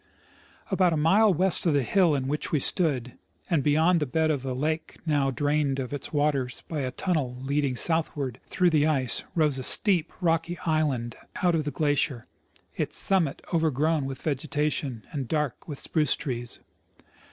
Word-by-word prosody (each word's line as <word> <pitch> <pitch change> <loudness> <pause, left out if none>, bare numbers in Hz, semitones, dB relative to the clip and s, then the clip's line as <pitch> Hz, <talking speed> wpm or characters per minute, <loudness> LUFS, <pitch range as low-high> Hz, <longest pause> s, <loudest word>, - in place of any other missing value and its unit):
About 185 -3 +3
a - - 0
mile 195 +8 +4
west 185 +1 +3
of 155 - +3
the 140 - +2
hill 175 - +3
on 130 -2 -2
which 150 +2 -3
we 150 - +2
stood, 135 -6 +1 0.4
and 165 -4 +3
beyond 160 +5 +3
the 150 - -1
bed 160 +4 +1
of 140 -4 -2
a 130 -1 -3
lake 155 +5 -2
now 145 -4 +1
drained 145 +1 0
of 130 0 -4
its 145 - -5
waters 145 -4 0
by 155 - -3
a 130 -2 -1
tunnel 135 -4 -2
leading 140 -1 0
southAvard 145 -4 0
through 180 -2 +2
the 155 -1 +3
ice, 135 -6 +1
rose 150 -5 +2
a - - -4
steep, 180 - +2
rocky 165 0 0
island 145 -8 0 0.3
out 175 -1 +4
of 155 -2 0
the - - -1
glaciers, 145 -5 0 0.5
its - - -3
summit 175 -8 0
OA'^ergrown 160 -2 +1
Avith 135 -1 -7
A^egetation 145 -4 -2
and 140 -6 -4
dark 150 -4 -2
with 145 -3 -6
spruce 155 0 0
trees. 120 -3 -4
150 Hz, 175 wpm, -26 LUFS, 135-160 Hz, 0.5 s, mile